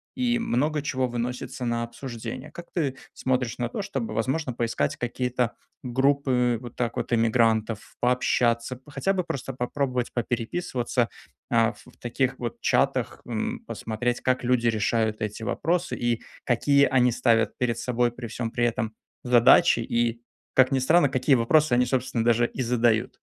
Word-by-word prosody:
и 240 Hz, -2 st, +1 dB
много 150 Hz, -, 0 dB
чего 130 Hz, -3 st, -1 dB
выносится 125 Hz, +1 st, -4 dB
на 120 Hz, 0 st, 0 dB
обсуждение. 120 Hz, +2 st, -7 dB
Как 175 Hz, 0 st, -11 dB
ты 145 Hz, -7 st, -1 dB, 0.2 s
смотришь 125 Hz, -2 st, -1 dB
на 120 Hz, -1 st, -1 dB
то, 165 Hz, -, -4 dB
чтобы, 135 Hz, -, -4 dB
возможно, 130 Hz, +4 st, -1 dB
поискать 115 Hz, -11 st, -1 dB
какие-то 125 Hz, 0 st, -1 dB, 0.3 s
группы 130 Hz, -1 st, +2 dB
вот 120 Hz, -1 st, -10 dB
так 120 Hz, -2 st, -2 dB
вот -, -, -2 dB
эмигрантов, 115 Hz, -1 st, +1 dB
пообщаться, 120 Hz, 0 st, +1 dB
п -, -, -26 dB
хотя 195 Hz, +6 st, 0 dB
бы 185 Hz, -2 st, 0 dB
просто 135 Hz, -4 st, -5 dB
попробовать 125 Hz, 0 st, -2 dB
попереписываться, 120 Hz, 0 st, -1 dB, 0.4 s
а, 115 Hz, -1 st, +3 dB
в -, -, -19 dB
таких 130 Hz, +2 st, -1 dB
вот 120 Hz, -2 st, -4 dB
чатах, -, -, +1 dB
м, -, -, -2 dB
посмотреть, 120 Hz, +2 st, -2 dB
как 130 Hz, 0 st, 0 dB
люди 125 Hz, -1 st, +2 dB
решают 110 Hz, -1 st, 0 dB
эти 105 Hz, +1 st, -4 dB
вопросы, 170 Hz, +9 st, -1 dB
и 120 Hz, -1 st, -1 dB, 0.2 s
какие 140 Hz, +3 st, +4 dB
они 125 Hz, -2 st, +3 dB
ставят 115 Hz, -2 st, +2 dB
перед 120 Hz, -2 st, 0 dB
собой, 120 Hz, -1 st, 0 dB
при 120 Hz, 0 st, -8 dB
всем 115 Hz, +1 st, -4 dB
при 120 Hz, -, +1 dB
этом, 110 Hz, -2 st, -2 dB, 0.3 s
задачи. 120 Hz, -2 st, +6 dB
И, 115 Hz, 0 st, 0 dB, 0.3 s
как 130 Hz, 0 st, +5 dB
ни 135 Hz, -, +2 dB
странно, 145 Hz, +3 st, +4 dB
какие 130 Hz, +1 st, +3 dB
вопросы 130 Hz, +3 st, +3 dB
они, 125 Hz, +1 st, +4 dB
собственно, 125 Hz, -2 st, -1 dB
даже 120 Hz, 0 st, +3 dB
и 130 Hz, -, -6 dB
задают. 120 Hz, -2 st, +1 dB
120 Hz, 155 wpm, -26 LUFS, 115-130 Hz, 0.4 s, задачи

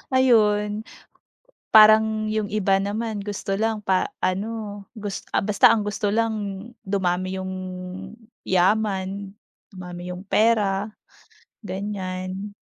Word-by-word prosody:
Ayun. 210 Hz, -4 st, +3 dB, 0.9 s
Parang 215 Hz, 0 st, +6 dB
yung 215 Hz, -1 st, 0 dB
iba 195 Hz, -2 st, +2 dB
naman 210 Hz, +2 st, -2 dB
gusto 200 Hz, -1 st, -3 dB
lang 220 Hz, -1 st, 0 dB
pa 190 Hz, -1 st, +2 dB, 0.2 s
ano, 205 Hz, +1 st, -3 dB
gus 205 Hz, -2 st, -6 dB
ah, -, -, +3 dB
basta 205 Hz, 0 st, +4 dB
ang 215 Hz, -, 0 dB
gusto 210 Hz, +1 st, -2 dB
lang 225 Hz, 0 st, +2 dB, 0.5 s
dumami 185 Hz, -1 st, 0 dB
yung 185 Hz, -, -5 dB, 0.9 s
yaman, 195 Hz, +1 st, +1 dB, 0.4 s
dumami 180 Hz, -1 st, -7 dB
yung 180 Hz, -, -8 dB
pera, 205 Hz, -1 st, +2 dB, 0.8 s
ganyan. 190 Hz, 0 st, -5 dB
205 Hz, 105 wpm, -24 LUFS, 190-215 Hz, 0.9 s, Parang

